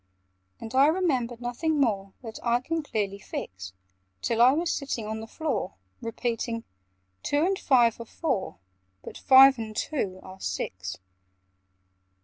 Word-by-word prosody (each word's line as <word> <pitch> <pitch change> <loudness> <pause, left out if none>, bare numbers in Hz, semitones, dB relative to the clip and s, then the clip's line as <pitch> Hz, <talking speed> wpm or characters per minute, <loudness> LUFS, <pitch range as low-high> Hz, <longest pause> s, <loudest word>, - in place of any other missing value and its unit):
And 225 +1 -8
I 270 +2 +6
remember 280 -9 +1
nothing 285 +6 -1
more 200 -7 0
That 225 -2 -7
I 235 0 +2
can 325 +6 -2
clearly 205 -8 -3
fix, 90 - -7 0.5
Till 230 0 +1
I 250 +2 +8
was 330 +4 0
sitting 275 -6 -3
on 220 +1 -4
the 220 - -8
floor, 310 - -3 0.3
Repeating 230 0 -3 0.6
"Two 290 +3 +1
and 385 +1 0
five 240 - +3
are - - -7
four, 245 - -2 0.5
But - - -9
five 265 -1 +8
and 215 -1 -6
two 200 -9 -2
are 190 0 -11
six." 90 - -4
235 Hz, 140 wpm, -27 LUFS, 215-280 Hz, 0.6 s, I